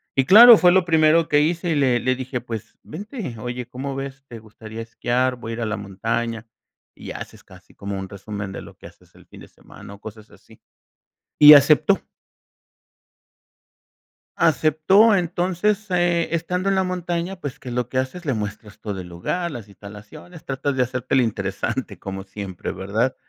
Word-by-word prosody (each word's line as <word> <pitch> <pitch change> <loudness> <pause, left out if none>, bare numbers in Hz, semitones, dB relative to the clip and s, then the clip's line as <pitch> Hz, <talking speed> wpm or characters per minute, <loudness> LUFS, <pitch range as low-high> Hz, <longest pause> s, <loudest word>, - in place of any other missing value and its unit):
Y 135 - +2
claro, 230 - +10
fue 180 -2 +5
lo 190 +1 +4
primero 160 -1 +3
que 145 0 +4
hice, 170 +3 -1
y 160 - +1
le 130 -4 +2
le 130 +2 0
dije: 130 -1 -5
"Pues, 115 -3 -8
vente, 200 - -7
oye, 120 +1 -6
¿cómo 135 +2 -6
ves? 135 0 -7
¿Te 115 -3 -10
gustaría 110 +1 -10
esquiar?, 125 +2 -1
voy 115 -1 -8
a - - -4
ir 120 - -5
a - - -1
la 105 - -3
montaña". 115 +3 -4 0.5
Y - - -9
haces - - -9
casi - - -19
como 100 -1 -5
un 95 - -7
resumen 100 0 -7
de - - -7
lo - - -14
que - - -11
haces - - -21
el - - -20
fin - - -15
de - - -13
semana 100 - -14
o 100 - -14
cosas 110 0 -11
así. - - -20 0.8
Y 150 0 +11
aceptó. 145 0 +5 2.4
Aceptó, 160 - +4
entonces, 185 +4 -1
eh, 175 -2 +1
estando 180 +3 -1
en 195 - +2
la 190 - +1
montaña, 180 0 -3
pues, 145 -6 -7
¿qué 130 - -10
es 120 - -5
lo 125 -1 -2
que 130 - -1
haces?, 130 +7 -4
le 140 - -1
muestras 105 -1 -6
todo 100 -3 -5
el 90 - -9
lugar, 170 - -3
las 115 -8 -9
instalaciones, 105 - -13
tratas 135 +1 -2
de 130 - +1
hacerte 125 +1 -4
el 135 - +5
interesante 110 0 -3
como 95 0 -6
siempre, 95 -2 -7
¿verdad? 105 +7 -1
130 Hz, 185 wpm, -22 LUFS, 110-170 Hz, 2.4 s, Y